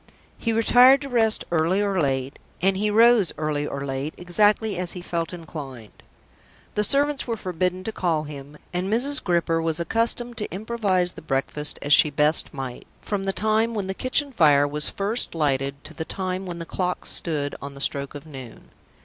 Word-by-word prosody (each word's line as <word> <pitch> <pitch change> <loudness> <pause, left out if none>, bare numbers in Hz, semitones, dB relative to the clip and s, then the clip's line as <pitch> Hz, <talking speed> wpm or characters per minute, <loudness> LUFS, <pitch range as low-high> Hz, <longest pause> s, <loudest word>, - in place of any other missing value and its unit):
He 230 - -2
retired 245 +4 +6
to 280 - -6
rest 225 -3 +1
early 170 +3 +2
or 200 -3 +1
late, 135 -1 -2 0.2
and 190 +2 +2
he 210 +2 0
rose 225 -2 +5
early 150 -1 -2
or 140 0 -5
late, 135 +3 -4
exactly 205 +4 +1
as 180 -1 -2
he 180 - -7
felt 170 -2 -3
inclined. 145 - -9 0.7
The 210 - 0
servants 285 +3 +2
were 230 -1 -2
forbidden 185 0 -2
to 220 - -3
call 170 -7 -1
him; 145 0 -10 0.2
and 180 +3 -2
Mrs. 275 +6 +3
Gripper 170 -2 +1
was 165 0 -1
accustomed 230 +6 -1
to 210 - -3
improvise 195 -3 0
the - - -12
breakfast 150 +1 -2
as 145 - +3
she 150 - +7
best 150 +2 +3
might, 135 -4 -7
from 200 -2 -3
the 195 - 0
time 220 +4 +1
when 205 -3 -2
the 190 - -3
kitchen 255 +6 0
fire 145 - +4
was 150 +1 0
first 205 0 -2
lighted 140 -2 -1
to 155 - -10
the 160 - -4
time 185 +2 -4
when 175 -1 -5
the 170 - -6
clock 180 +1 -3
stood 145 -4 -2
on 140 0 -8
the - - -10
stroke 140 0 -1
of 145 - -9
noon. 130 -6 -11
180 Hz, 190 wpm, -24 LUFS, 150-215 Hz, 0.7 s, she